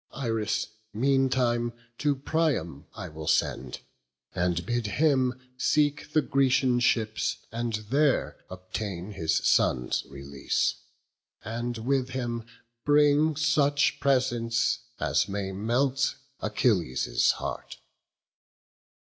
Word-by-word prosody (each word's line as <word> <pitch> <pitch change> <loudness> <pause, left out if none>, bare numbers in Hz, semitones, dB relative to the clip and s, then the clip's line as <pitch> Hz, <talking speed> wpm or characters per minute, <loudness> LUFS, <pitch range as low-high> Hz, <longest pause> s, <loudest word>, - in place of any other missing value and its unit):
Iris 115 -5 -1 0.3
meantime 125 -2 +2 0.3
to 145 -1 +2
Priam 135 - -1
I 100 -5 -6
will 80 -1 -8
send, 65 -5 0 0.5
And 90 -1 0
bid 120 -2 -1
him 130 +1 +2 0.2
seek 145 +2 +1
the 155 - +3
Grecian 130 -2 +2
ships, 110 -3 +1
and 115 0 -3 0.2
there 145 0 +2
Obtain 95 +1 -5
his 80 -4 -1
son's 65 -1 +2
release: 70 0 -1 0.7
and 120 +2 -3
with 130 +3 0
him 120 -3 -4 0.4
bring 150 +1 +4
Such 145 -2 +2
presents 120 -4 +1 0.2
as - - +1
may 100 -1 -3
melt 130 +7 0 0.3
Achilles' 85 - +1
heart." - - -6
120 Hz, 100 wpm, -27 LUFS, 100-140 Hz, 0.7 s, bring